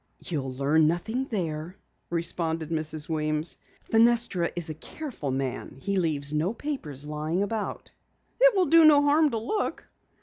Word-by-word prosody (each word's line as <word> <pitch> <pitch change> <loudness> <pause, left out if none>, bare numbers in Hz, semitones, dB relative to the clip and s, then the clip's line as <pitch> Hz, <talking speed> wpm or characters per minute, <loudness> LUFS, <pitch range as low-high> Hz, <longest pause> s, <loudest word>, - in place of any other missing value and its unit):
"You'll 140 -6 -4
learn 145 +4 +2
nothing 220 +11 -1
there," 170 - -4 0.3
responded 165 -1 -1
Mrs. 155 -1 -2
Weems. 155 0 -1 0.3
"Fenestra 230 -6 +3
is 175 -1 -2
a 155 - -4
careful 230 - -7
man. 130 0 -4
He 200 +7 -2
leaves 150 -5 +1
no 165 +9 0
papers 155 - -4
lying 155 +5 -2
about." 215 +1 -4 0.5
"It - - +6
will 375 -2 +3
do 330 +2 +6
no 295 -2 +7
harm 295 +2 +4
to 230 - -2
look." 325 - -3
170 Hz, 145 wpm, -27 LUFS, 155-235 Hz, 0.5 s, no